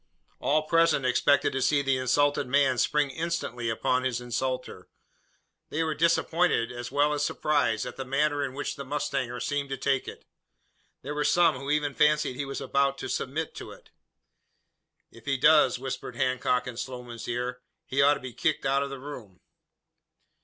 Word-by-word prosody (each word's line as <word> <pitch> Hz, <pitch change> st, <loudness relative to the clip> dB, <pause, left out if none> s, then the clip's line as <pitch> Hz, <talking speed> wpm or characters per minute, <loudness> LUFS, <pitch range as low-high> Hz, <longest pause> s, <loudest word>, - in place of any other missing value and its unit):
All 155 Hz, +2 st, +1 dB
present 165 Hz, -3 st, +3 dB
expected 140 Hz, +3 st, +3 dB
to 135 Hz, -, -1 dB
see 140 Hz, +2 st, +2 dB
the 135 Hz, -1 st, +2 dB
insulted 145 Hz, +2 st, +2 dB
man 130 Hz, -1 st, +2 dB
spring 150 Hz, -2 st, +1 dB
instantly 135 Hz, -6 st, -3 dB
upon 125 Hz, +3 st, 0 dB
his 125 Hz, -2 st, -1 dB
insulter. 125 Hz, +2 st, -4 dB, 0.8 s
They 160 Hz, +2 st, -1 dB
were 160 Hz, -1 st, -1 dB
disappointed, 165 Hz, -5 st, +2 dB
as 120 Hz, 0 st, -7 dB
well 145 Hz, +2 st, +2 dB
as 145 Hz, -1 st, -1 dB
surprised, 145 Hz, -9 st, 0 dB
at -, -, -7 dB
the 135 Hz, -, -3 dB
manner 145 Hz, +2 st, 0 dB
in 135 Hz, -2 st, -4 dB
which 145 Hz, -, -4 dB
the 140 Hz, -, -5 dB
mustanger 135 Hz, -3 st, -3 dB
seemed 140 Hz, +3 st, -2 dB
to 135 Hz, -, -3 dB
take 135 Hz, -1 st, 0 dB
it. -, -, -9 dB, 0.8 s
There 145 Hz, -, -4 dB
were 150 Hz, 0 st, -1 dB
some 160 Hz, 0 st, +3 dB
who 140 Hz, +1 st, -6 dB
even 150 Hz, -1 st, +1 dB
fancied 150 Hz, -3 st, +2 dB
he 140 Hz, +2 st, -3 dB
was 135 Hz, 0 st, -5 dB
about 140 Hz, 0 st, +1 dB
to -, -, -6 dB
submit 155 Hz, +5 st, -3 dB
to -, -, -8 dB
it. -, -, -15 dB, 1.2 s
"If 115 Hz, -, -16 dB
he 135 Hz, -1 st, 0 dB
does," 135 Hz, -2 st, +5 dB
whispered 130 Hz, -1 st, -6 dB
Hancock 125 Hz, 0 st, 0 dB
in 125 Hz, -2 st, -7 dB
Sloman's 125 Hz, -2 st, -7 dB
ear, 125 Hz, +1 st, -3 dB, 0.2 s
"he 140 Hz, -2 st, 0 dB
ought 145 Hz, +1 st, +5 dB
to -, -, -7 dB
be 130 Hz, -2 st, -8 dB
kicked 155 Hz, 0 st, -1 dB
out 135 Hz, +1 st, +2 dB
of 140 Hz, -, -2 dB
the 135 Hz, -, -6 dB
room." 130 Hz, -9 st, -10 dB
140 Hz, 180 wpm, -27 LUFS, 125-150 Hz, 1.2 s, does